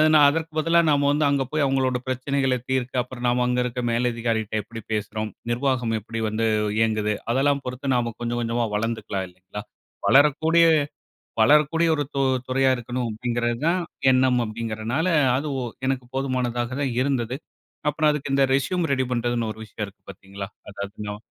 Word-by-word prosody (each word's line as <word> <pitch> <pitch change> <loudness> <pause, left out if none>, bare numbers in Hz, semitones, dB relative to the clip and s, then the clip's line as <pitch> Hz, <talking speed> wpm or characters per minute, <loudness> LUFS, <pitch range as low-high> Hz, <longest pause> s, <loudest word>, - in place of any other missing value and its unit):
நான் 150 - +7
அதற்கு 160 +2 -2
பதிலா 165 +2 +3
நாம 145 -1 +3
வந்து 150 +1 +2
அங்க 140 -1 +2
போய் 155 -1 +1
அவங்களோட 130 -2 +1
பிரச்சனைகள 130 +1 0 0.2
தீர்க்க. 130 -1 -1
அப்புறம் 125 -1 -7
நாம 125 +1 +2
அங்க 125 0 +1
இருக்கிற 125 0 -3
மேலதிகாரி 115 -1 0
கிட்ட 110 - -6
எப்படி 115 +2 -9
பேசுறோம்? 110 +1 -2 0.2
நிர்வாகம் 125 -2 0
எப்படி 115 +2 -6
வந்து 110 +1 -1 0.3
இயங்குது? 110 -1 +1 0.2
அதெல்லாம் 140 +3 +2
பொறுத்து 130 +1 -2
நாம 120 -1 0
கொஞ்சம் 120 0 -1
கொஞ்சமா 120 0 0
வளர்ந்துக்கலாம் 105 -3 -2
இல்லைங்களா? 95 +3 -9 0.5
வளரக்கூடிய, 160 +4 +5 0.8
வளரக்கூடிய 150 +6 +4
ஒரு 145 - 0
து 140 - 0 0.3
துறையா 135 +1 +3
இருக்கணும். 120 0 -3
அப்படிங்கிறது 120 +1 -1
தான் 180 +2 +2 0.3
எண்ணம் 130 -1 +4
அப்படிங்கிறதனால, 115 +6 -2 0.3
அது 145 +3 -2 0.4
எனக்கு 130 -1 -1
போதுமானதா 130 -3 -1
தான் 135 -1 -1
இருந்தது. 130 -3 -1 0.5
அப்புறம் 150 +1 +2
அதுக்கு 145 -2 -2
இந்த 135 0 +4
ரெஸ்யூம் 175 +6 +1
ரெடி 130 -1 +1
பண்ணுறதுன்னு 120 -2 0
ஒரு 110 - -16
விஷயம் 105 0 -5
இருக்கு 100 +1 -17
பாத்தீங்களா, 100 +1 -8 0.2
அதாவது 105 +1 -6
125 Hz, 155 wpm, -24 LUFS, 115-140 Hz, 0.8 s, நான்